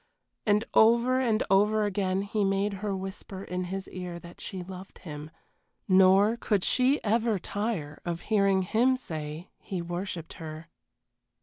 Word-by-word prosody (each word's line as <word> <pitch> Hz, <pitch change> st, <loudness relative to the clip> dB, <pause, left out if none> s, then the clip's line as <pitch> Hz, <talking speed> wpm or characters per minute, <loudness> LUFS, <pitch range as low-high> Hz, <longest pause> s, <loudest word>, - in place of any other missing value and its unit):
And 210 Hz, +2 st, +3 dB
over 235 Hz, +3 st, +5 dB
and 230 Hz, -4 st, +2 dB
over 210 Hz, +2 st, +4 dB
again 195 Hz, -1 st, 0 dB
he 205 Hz, +1 st, -1 dB
made 195 Hz, +1 st, +1 dB
her 205 Hz, -2 st, -1 dB
whisper 190 Hz, 0 st, -7 dB
in 180 Hz, -1 st, -3 dB
his 190 Hz, +1 st, -4 dB
ear 180 Hz, -2 st, -6 dB
that 170 Hz, 0 st, -12 dB
she 190 Hz, -3 st, -5 dB
loved 185 Hz, +1 st, -10 dB
him 150 Hz, -3 st, -8 dB, 0.6 s
nor 195 Hz, +4 st, +5 dB
could 205 Hz, -5 st, 0 dB
she 260 Hz, +3 st, +3 dB
ever 225 Hz, 0 st, +2 dB
tire 190 Hz, -6 st, -3 dB
of 170 Hz, -1 st, -3 dB
hearing 195 Hz, -3 st, +2 dB
him 240 Hz, +7 st, +2 dB
say 155 Hz, -5 st, -6 dB
he 190 Hz, -, -5 dB
worshipped 175 Hz, -1 st, -5 dB
her. 160 Hz, +1 st, -8 dB
195 Hz, 145 wpm, -28 LUFS, 180-215 Hz, 0.6 s, over